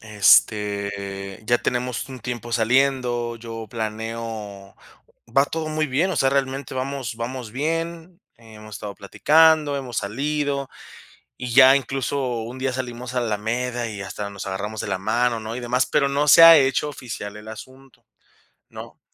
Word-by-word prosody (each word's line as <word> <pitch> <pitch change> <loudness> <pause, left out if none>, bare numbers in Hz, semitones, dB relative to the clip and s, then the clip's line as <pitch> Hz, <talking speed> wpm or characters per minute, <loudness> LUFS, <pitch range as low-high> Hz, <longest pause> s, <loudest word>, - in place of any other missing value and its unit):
este, 100 -2 +1
ya 120 - +3
tenemos 125 0 -2
un 130 -2 -9
tiempo 120 -1 -5
saliendo, 120 0 +1
yo 115 -1 -8
planeo, 110 -3 -6 0.6
va 135 - +6
todo 160 -1 -4
muy 155 0 -1
bien, 150 +8 0
o 180 - -3
sea, 135 -1 +3
realmente 135 0 -2
vamos 130 -2 -4
vamos 120 0 -5
bien, 165 - -3 0.2
hemos 110 -2 -12
estado 105 -2 -7
platicando, 150 +7 +3
hemos 130 -3 -4
salido, 140 +5 -2 0.7
y 125 -1 -5
ya 130 0 +8
incluso 135 -2 -2
un 120 +3 -8
día 130 0 -1
salimos 125 -1 -5
a - - +2
la - - -2
alameda 115 +3 -2
y 105 -2 -7
hasta 100 +1 -5
nos 100 -1 -8
agarramos 105 +3 -4
de - - -5
la 95 - -1
mano, 120 +3 0
¿no?, 110 +1 -6
y - - -4
demás, 125 +1 0
pero 140 - +2
no 145 +2 0
se 165 - +9
ha 165 0 +11
hecho 135 +1 +1
oficial 110 -7 -7
el 105 +1 -12
asunto, 130 +4 -12 0.6
¿no? - - -11
120 Hz, 160 wpm, -23 LUFS, 110-135 Hz, 0.7 s, ha